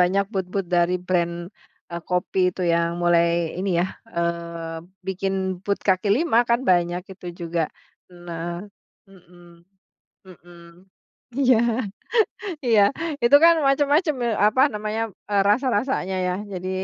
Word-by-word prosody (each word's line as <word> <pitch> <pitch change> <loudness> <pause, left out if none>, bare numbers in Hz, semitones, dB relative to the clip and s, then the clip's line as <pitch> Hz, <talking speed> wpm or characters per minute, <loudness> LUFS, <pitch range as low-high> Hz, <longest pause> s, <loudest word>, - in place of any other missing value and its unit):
banyak 190 +3 +3
booth-booth 190 0 -2
dari 175 +1 +3
brand, 170 -2 +1 0.6
eee, 170 - -5
kopi 180 +2 -1
itu 180 0 -6
yang 170 0 0
mulai 170 -1 +2
ini 190 +1 -1
ya, 175 - +1 0.3
eee, 170 -1 -3 0.2
bikin 190 -1 -2
booth 200 0 -1
kaki 190 +1 +2
lima 250 +2 +3
kan 235 +1 +3
banyak 175 0 +1
itu 185 -1 -12
juga. 170 0 -2 0.5
Nah 175 -1 -6 0.5
mhm 175 -2 -19 0.6
mhm, 175 -2 -16 0.9
iya, 255 -3 +5 1.1
iya. 220 -4 +5 0.4
Itu 240 +4 +7
kan 335 0 +8
macem-macem, 290 +4 +2
eee, 235 -3 0
apa 260 +5 +3
namanya, 215 +1 -2 0.3
eee, 200 -1 +3
rasa-rasanya 240 -3 +1
ya 180 - 0 0.2
jadi 185 0 -4
185 Hz, 125 wpm, -23 LUFS, 170-210 Hz, 1.1 s, kan